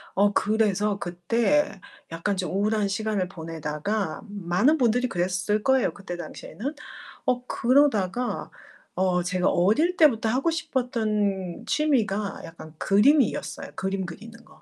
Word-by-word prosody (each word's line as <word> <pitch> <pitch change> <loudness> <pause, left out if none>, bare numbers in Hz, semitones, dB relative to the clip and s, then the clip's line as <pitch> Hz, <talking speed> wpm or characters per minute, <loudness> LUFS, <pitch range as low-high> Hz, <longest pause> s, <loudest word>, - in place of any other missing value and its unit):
어 200 +1 +4
그래서 210 -1 +1
그때 210 - 0 0.3
약간 185 +4 -2
좀 185 - -2
우울한 210 +1 +1
시간을 200 -1 -1
보내다가 165 +2 -3
많은 205 - +1
분들이 245 -1 +2
그랬을 185 +4 -1
거예요, 265 0 +3
그때 190 -3 -7
당시에는. 220 - -6 0.5
어 250 -2 0
그러다가 245 -3 +1 0.4
어 180 -1 +1
제가 180 0 +1
어릴 265 - +2
때부터 230 -8 +4
하고 275 +8 +1
싶었던 215 - -1
취미가 215 -10 0
약간 160 -1 -12
그림이었어요 255 - +2
그림 190 0 -2
그리는 225 +7 -11
거. - - -20
210 Hz, 290 characters per minute, -25 LUFS, 185-245 Hz, 0.5 s, 어